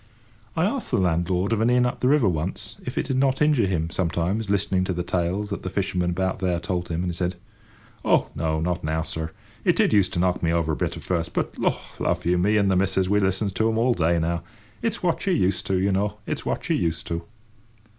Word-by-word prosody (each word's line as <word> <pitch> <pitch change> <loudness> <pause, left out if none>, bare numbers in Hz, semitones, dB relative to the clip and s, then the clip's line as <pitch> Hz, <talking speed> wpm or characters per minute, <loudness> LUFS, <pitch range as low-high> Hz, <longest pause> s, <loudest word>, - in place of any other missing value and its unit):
I 160 - +3
asked 240 +5 -1
the - - +1
landlord 90 +3 +1
of 110 - +1
an 115 - +3
inn 125 0 +4
up 125 - -2
the 125 - +1
river 140 -5 +4
once, 85 +1 -2
if - - -6
it - - +1
did 130 - -1
not 135 0 +2
injure 150 -8 +3
him, 85 -3 -1
sometimes, 95 +5 -1
listening 100 -2 +1
to 95 - -1
the 90 0 -2
tales 90 +4 -1
that 100 - -3
the 95 - -4
fishermen 90 -2 -1
about 95 +1 -1
there 90 -2 0
told 90 0 -2
him; 85 0 -1
and 90 - -1
he - - -5
said: 90 +1 -1 0.7
"Oh, - - +2
no; 80 0 -1
not 85 +2 -1
now, 80 +1 0
sir. 80 -1 -4 0.3
It - - +3
did - - +3
used 100 -3 +4
to 85 - 0
knock 90 0 +1
me 80 - +1
over 85 -1 +1
a - - 0
bit - - -2
at - - -9
first, 85 -3 -1
but, - - -1
lor - - +2 0.2
love - - 0
you! 90 +1 +3
me 105 +4 +3
and 100 -2 +3
the - - +3
missus 95 0 +1
we 105 +1 +3
listens 95 +1 0
to 110 +3 +2
'em 110 - 0
all 120 +2 +3
day 85 -3 +2
now. 85 +1 0 0.4
It's 230 -4 -2
what 175 -2 +1
you're 185 - +3
used 95 - +1
to, 95 - +1
you 95 +2 +2
know. 100 +2 0
It's - - -3
what - - -2
you're - - +2
used 85 -1 -1
to." 85 0 -3
95 Hz, 250 wpm, -24 LUFS, 85-105 Hz, 0.7 s, inn